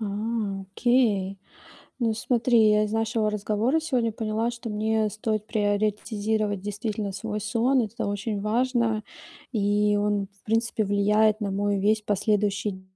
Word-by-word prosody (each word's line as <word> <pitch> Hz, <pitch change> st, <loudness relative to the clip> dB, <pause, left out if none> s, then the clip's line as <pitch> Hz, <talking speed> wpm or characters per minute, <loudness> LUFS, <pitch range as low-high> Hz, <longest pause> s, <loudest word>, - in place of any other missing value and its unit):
А, -, -, -2 dB, 0.6 s
окей. 200 Hz, -2 st, +1 dB, 0.6 s
Ну, 230 Hz, -2 st, +2 dB
смотри, 230 Hz, -1 st, +3 dB
я 210 Hz, 0 st, +4 dB
из 210 Hz, -, -4 dB
нашего 225 Hz, -1 st, 0 dB
разговора 215 Hz, +8 st, 0 dB
сегодня 250 Hz, -8 st, 0 dB
поняла, 220 Hz, +1 st, -1 dB
что 235 Hz, -1 st, -7 dB
мне 215 Hz, +1 st, +1 dB
стоит 215 Hz, 0 st, -2 dB
приоритизировать 210 Hz, -1 st, 0 dB
действительно 205 Hz, 0 st, -3 dB
свой 210 Hz, +2 st, -4 dB
сон. 235 Hz, +4 st, +2 dB
Это 225 Hz, +1 st, -4 dB
очень 205 Hz, +1 st, -2 dB
важно. 230 Hz, 0 st, +1 dB, 0.5 s
И 205 Hz, -1 st, +2 dB
он, 205 Hz, -1 st, 0 dB
в 200 Hz, 0 st, -32 dB
принципе, 225 Hz, 0 st, 0 dB
влияет 210 Hz, +2 st, +3 dB
на 205 Hz, -2 st, -2 dB
мой 200 Hz, +1 st, 0 dB
весь 210 Hz, +2 st, +2 dB
последующий 205 Hz, -1 st, 0 dB
215 Hz, 135 wpm, -26 LUFS, 205-225 Hz, 0.6 s, я